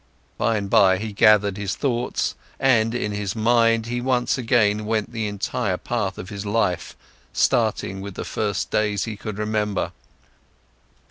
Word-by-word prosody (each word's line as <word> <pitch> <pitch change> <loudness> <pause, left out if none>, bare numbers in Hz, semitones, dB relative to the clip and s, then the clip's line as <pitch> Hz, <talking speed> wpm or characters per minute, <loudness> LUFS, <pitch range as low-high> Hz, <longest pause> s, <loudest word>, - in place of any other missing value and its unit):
By 115 -1 +1
and 100 -1 -3
by, 95 -1 +5
he 105 +2 -5
gathered 105 -2 +4
his 100 -2 -2
thoughts, 120 -4 -1 0.3
and 115 -3 +3
in 105 -4 -1
his 100 -1 -3
mind, 115 0 +3
he 120 +1 -3
once 125 -1 +1
again 110 -4 +2
went 110 -1 -1
the 110 -2 -2
entire 100 -2 -2
path 105 -5 -2
of 90 - -7
his 100 -1 -6
life, 100 -4 -1 0.4
starting 95 +1 +1
with 100 -1 -7
the - - -5
first 105 -2 -2
days 105 -2 +1
he 110 -2 -4
could 105 0 -6
remember. 105 -2 -1
105 Hz, 155 wpm, -23 LUFS, 100-115 Hz, 0.4 s, by